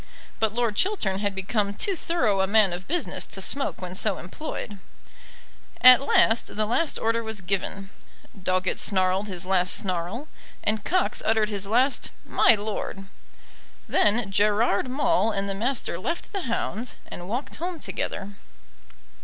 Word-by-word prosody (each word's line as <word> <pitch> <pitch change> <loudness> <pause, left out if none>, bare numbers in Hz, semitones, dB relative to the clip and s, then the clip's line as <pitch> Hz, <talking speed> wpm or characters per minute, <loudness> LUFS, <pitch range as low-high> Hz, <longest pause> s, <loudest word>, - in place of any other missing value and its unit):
But 220 -1 0
Lord 235 -3 0
Chiltern 220 - 0
had 200 -1 -2
become 200 +1 -1
too 390 - +1
thorough 245 - 0
a 190 - +1
man 205 -2 +4
of 180 +2 -6
business 345 +2 -1
to 195 - -5
smoke 275 +1 0
when 180 0 -6
so 200 +1 +1
employed. 205 - -7 1.0
At 255 +1 +9
last 235 -4 +2
the 215 0 +1
last 285 +9 0
order 230 +1 0
was 220 -2 -4
given, 195 +1 -3 0.4
Doggett 185 -1 0
snarled 190 +1 +2
his 185 -2 -4
last 180 -1 +3
snarl, 185 - -3 0.4
and 215 +1 +1
Cox 370 0 +1
uttered 220 -1 +2
his 200 -2 -1
last 255 +6 +2 0.2
"My 230 - +5
lord." 205 -2 -5 0.8
Then 210 -1 +2
Gerard 210 +3 +2
Maule 285 -3 +1
and 195 0 -1
the 195 - -1
Master 230 -4 -2
left 335 - -4
the 375 -11 -3
hounds 230 +1 -2
and 175 +1 -9
walked 245 +6 -4
home 345 +1 -4
together. 200 -7 -4
210 Hz, 150 wpm, -25 LUFS, 195-245 Hz, 1.0 s, At